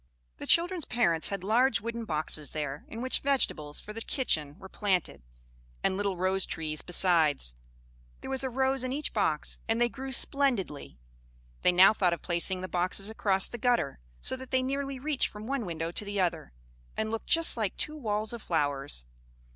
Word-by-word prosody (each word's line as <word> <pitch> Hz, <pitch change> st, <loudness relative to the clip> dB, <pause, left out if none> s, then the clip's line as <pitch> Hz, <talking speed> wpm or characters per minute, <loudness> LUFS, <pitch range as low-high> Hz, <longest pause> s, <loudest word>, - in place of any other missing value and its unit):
The -, -, -8 dB
children's 345 Hz, -1 st, +3 dB
parents 170 Hz, -10 st, +2 dB
had 200 Hz, -2 st, -4 dB
large 230 Hz, +2 st, +3 dB
wooden 230 Hz, +2 st, -5 dB
boxes 155 Hz, -3 st, +1 dB
there, 145 Hz, -1 st, -4 dB
in 230 Hz, +2 st, -7 dB
which 260 Hz, -, +4 dB
vegetables 165 Hz, -, +1 dB
for 210 Hz, -, -10 dB
the 225 Hz, -, -6 dB
kitchen 155 Hz, -, -1 dB
were 190 Hz, -, -11 dB
planted, 190 Hz, -, -1 dB, 0.6 s
and -, -, +1 dB
little 200 Hz, -2 st, -1 dB
rosetrees 175 Hz, -4 st, -1 dB
besides: 165 Hz, -, +3 dB, 0.7 s
there -, -, -7 dB
was 265 Hz, 0 st, 0 dB
a 265 Hz, -, -1 dB
rose 265 Hz, +1 st, 0 dB
in 255 Hz, -, -2 dB
each 290 Hz, +2 st, -3 dB
box, 160 Hz, -8 st, +1 dB
and 225 Hz, +1 st, 0 dB
they 240 Hz, 0 st, +3 dB
grew 265 Hz, +2 st, -7 dB
splendidly. 240 Hz, -, 0 dB, 0.6 s
They -, -, +4 dB
now 185 Hz, +4 st, +7 dB
thought 180 Hz, -5 st, +1 dB
of 170 Hz, -, -6 dB
placing 180 Hz, +1 st, -1 dB
the 185 Hz, -, -4 dB
boxes 185 Hz, +3 st, 0 dB
across 195 Hz, -3 st, +2 dB
the 240 Hz, -, -8 dB
gutter, 240 Hz, -, 0 dB, 0.2 s
so -, -, 0 dB
that 260 Hz, 0 st, -10 dB
they 260 Hz, -1 st, +1 dB
nearly 275 Hz, +1 st, -3 dB
reached 285 Hz, +1 st, -1 dB
from 210 Hz, 0 st, -10 dB
one 260 Hz, -4 st, -2 dB
window 165 Hz, 0 st, -4 dB
to 190 Hz, -, +1 dB
the 205 Hz, -1 st, -4 dB
other, 170 Hz, -, -1 dB, 0.5 s
and 220 Hz, 0 st, -2 dB
looked 225 Hz, -, -4 dB
just 330 Hz, 0 st, +5 dB
like 215 Hz, -5 st, -2 dB
two 305 Hz, -, -2 dB
walls 215 Hz, -5 st, -2 dB
of 235 Hz, -, -7 dB
flowers. 145 Hz, -, -1 dB
205 Hz, 185 wpm, -29 LUFS, 170-255 Hz, 0.7 s, now